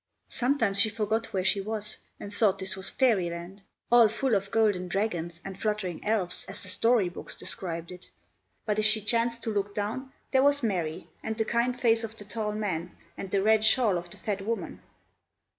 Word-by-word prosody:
Sometimes 240 -6 +2
she 220 - +5
forgot 220 +1 -1
where 190 -1 -1
she 195 +1 +3
was, 210 +1 -4 0.2
and 205 - -8
thought 205 -2 +3
this 190 0 -2
was 190 0 0
fairy 220 -10 +2
land, 170 +4 -8 0.3
all 240 -2 +8
full 235 +3 -1
of 195 -1 +1
golden 205 -5 +2
dragons, 175 -4 -2
and 195 -1 -6
fluttering 210 -6 -2
elves, 205 -5 0
as - - -6
the 190 - -6
story 225 0 +3
books 175 - -7
described 170 -2 -4
it; 180 0 -11 0.6
but 215 -1 0
if 215 - +2
she 215 0 +5
chanced 230 +2 +1
to 225 - -2
look 200 0 -2
down, 225 +6 -3 0.2
there 265 - +4
was 285 0 +3
Mary, 175 -6 -2
and 220 0 -4
the 220 - +1
kind 240 +2 0
face 230 -1 +3
of 225 0 -6
the 205 - -9
tall 210 +1 -2
man, 180 -5 -3 0.2
and 195 - -6
the 195 0 +1
red 220 0 +4
shawl 220 -2 +4
of 175 0 -4
the - - -11
fat 200 -2 -3
woman. 225 +3 -4
210 Hz, 200 wpm, -28 LUFS, 190-225 Hz, 0.6 s, all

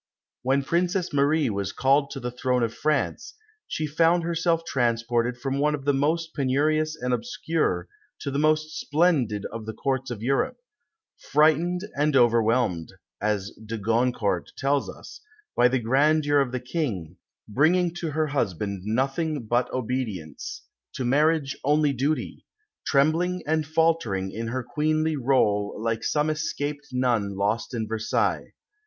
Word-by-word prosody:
When 135 +2 +1
Princess 175 +3 0
Marie 145 -1 +2
was 100 -1 -2
called 140 +1 +2
to - - -6
the 125 -1 -4
throne 125 0 0
of 115 -1 -1
France, 155 0 -1 0.3
she 155 - -2
found 165 +3 +3
herself 165 0 0
transported 120 -1 0
from 135 +3 -2
one 150 +1 +2
of 140 -2 -9
the 145 - +3
most 160 +4 0
penurious 155 +3 +1
and 125 -3 -2
obscure 150 - -1 0.3
to 140 - -3
the 140 - -1
most 155 +1 +1
splendid 145 - +1
of 115 -1 -7
the 110 - -5
Courts 135 -1 -1
of 115 -3 -6
Europe 140 - 0 0.6
"frightened 160 +4 +2
and 150 0 +1
overwhelmed," 115 -7 +2 0.3
as 105 -1 -1
de 110 +1 -5
Goncourt 115 -3 0
tells 140 +1 0
us, - - -11 0.3
"by 125 - +5
the 130 +1 +1
grandeur 145 +5 +3
of 135 -3 +1
the 130 - -2
King, 115 - -3 0.3
bringing 165 - +2
to 170 -2 -3
her 155 +1 0
husband 100 - -2
nothing 135 - -1
but 120 +3 0
obedience, 115 -10 -4 0.3
to 130 - -2
marriage 145 +2 +2
only 150 0 +3
duty; 140 +5 -2 0.4
trembling 165 +6 +2
and 155 0 0
faltering 155 -13 +1
in 115 +2 -4
her 130 +2 -2
queenly 155 +4 0
rôle 115 -7 +1
like 115 0 -1
some 150 +1 +1
escaped 150 -1 -3
nun 120 -6 0
lost 110 +5 -1
in 110 -2 -2
Versailles." 110 0 -1
135 Hz, 145 wpm, -25 LUFS, 115-155 Hz, 0.6 s, by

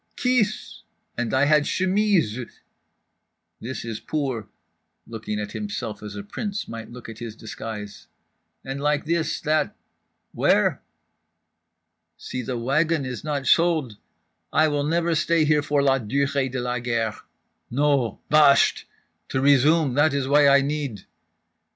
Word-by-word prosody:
Kis!_ 250 -5 0 0.4
And 120 -1 -2
I 130 +2 +3
had 150 0 +4
chemises… 185 - 0 1.0
this 125 +1 -6
is 115 -2 -5
poor" 135 -8 -3 0.6
(looking 110 -2 -5
at 105 -1 -5
himself 130 - -5
as 105 -1 -8
a 100 - -6
prince 205 - -5
might 115 -1 -8
look 120 0 -10
at 115 -1 -9
his 115 -2 -7
disguise)—"and 110 +5 -9
like 150 +1 +1
this, 165 0 -1
that—where?" 155 +1 -1 1.4
"Si 125 - -5
the 125 +1 -4
wagon 145 +5 +1
is 125 -1 -5
not 145 -3 -2
sold… 155 -7 +2 0.5
I 155 +1 +4
never 155 +4 0
will 165 - +2
stay 160 0 +2
here 150 0 +3
for 145 -1 +1
la 135 -1 +3
durée 140 +3 0
de 130 - -3
la 125 0 -2
guerre. 115 -2 -1 0.5
No—bahsht! 140 +2 +3 0.4
To 130 - -1
resume, 140 +1 +4
that 145 +2 +3
is 135 -2 -1
why 145 +1 +5
I 140 0 +6
need…." 140 -8 -3
140 Hz, 130 wpm, -24 LUFS, 120-155 Hz, 1.4 s, I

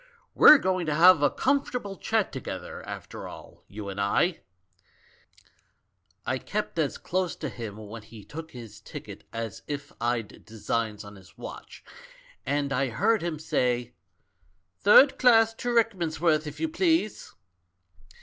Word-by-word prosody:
We're 305 - +9
going 185 - -1
to 150 - 0
have 175 0 +7
a 145 - +4
com 275 +1 +1
fortable 205 -6 -6
chat 220 -3 0
together, 130 - -7
after - - -7
all, - - -12
you 105 0 -8
and 100 0 -4
I 160 - +1 1.3
!' - - -43
"I - - -1
kept - - -4
as - - 0
close 185 -1 -2
to 155 - -5
him 115 -4 -7
when 110 +1 -9
he 110 -1 -13
took 160 +6 -9
his 115 -4 -11
ticket - - -10
as 115 -3 -5
if 145 -1 -6
I'd 115 -2 -2
designs 110 -1 -3
on 105 0 -12
his 95 -2 -18
watch, - - -10 0.6
and 140 0 0
I 135 0 0
heard 210 - +1
him 170 -2 -3
say, 125 -5 -1 0.9
'Thu'd 265 +7 +6
class 225 -3 +5
to 245 +2 -4
Rickmansworth, 170 -9 +1
if 150 - -8
you 325 - 0
please.' 325 - 0
150 Hz, 150 wpm, -27 LUFS, -, 1.3 s, We're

